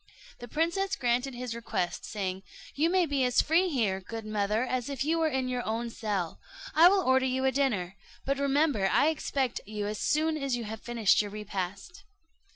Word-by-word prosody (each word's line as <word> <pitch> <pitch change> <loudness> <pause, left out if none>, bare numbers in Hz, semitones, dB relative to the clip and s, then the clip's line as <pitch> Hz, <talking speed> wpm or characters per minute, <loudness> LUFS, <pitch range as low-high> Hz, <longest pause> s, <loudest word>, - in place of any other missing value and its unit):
The 240 - -8
princess 340 - 0
granted 250 -1 0
his 245 -1 -4
request, 185 -6 -3
saying, 190 -3 -3 0.3
"You 315 +4 +2
may 365 0 +3
be 280 -4 0
as 250 -1 +2
free 345 +4 +3
here, 220 - 0
good 225 +3 -7
mother, 215 +1 0
as 255 0 -2
if 270 -1 -2
you 325 +2 +1
were 320 - +3
in 265 -3 -1
your 250 -1 -2
own 230 +2 -2
cell: 200 -7 -3 0.3
I 330 +2 +8
will 390 0 +2
order 260 -1 +3
you 260 +1 0
a 265 - +4
dinner, 210 -9 0 0.3
but 275 0 0
remember 280 -7 +2
I 295 - +4
expect 275 -5 -1
you 210 -1 -4
as 210 0 -3
soon 310 +1 +1
as 275 -4 -1
you 240 - -4
have 220 0 -6
finished 230 -5 +3
your 205 - -5
repast." 200 - -5
250 Hz, 195 wpm, -29 LUFS, 215-285 Hz, 0.3 s, I